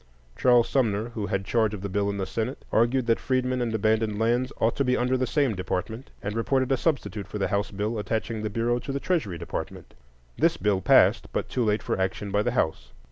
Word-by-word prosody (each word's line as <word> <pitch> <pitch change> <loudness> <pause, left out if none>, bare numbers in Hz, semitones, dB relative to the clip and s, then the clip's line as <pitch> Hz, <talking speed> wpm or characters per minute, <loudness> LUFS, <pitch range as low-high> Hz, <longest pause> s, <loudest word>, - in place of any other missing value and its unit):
Charles 120 -2 +4
Sumner, 115 -4 0
who 110 -4 -4
had 95 0 -2
charge 110 0 +1
of 95 - -8
the 100 - -3
bill 100 +1 0
in 100 - -3
the 95 - -2
Senate, 115 +7 -4
argued 120 +3 +2
that 115 -1 +2
freedmen 130 -1 0
and 120 -2 -1
abandoned 110 0 +1
lands 120 +4 +1
ought 115 - +1
to 140 - +2
be 125 -1 +2
under 125 +1 +1
the 130 0 0
same 140 -4 +1
department, 110 +6 -4
and 105 +1 -3
reported 130 +3 +1
a - - +5
substitute 120 - -1
for 105 - -5
the 95 - -1
House 100 +1 0
bill 105 +3 -2
attaching 110 +1 -2
the 110 - -2
Bureau 115 +3 0
to 135 - -6
the 140 - -2
Treasury 130 - -1
Department. 85 - -6 0.5
This - - +3
bill 100 -2 +1
passed, - - +4
but - - -2
too 125 - 0
late 105 -1 +1
for - - -1
action 95 +2 -2
by 105 - +2
the 120 +2 -1
House. 65 -6 -1
110 Hz, 230 wpm, -26 LUFS, 100-125 Hz, 0.5 s, a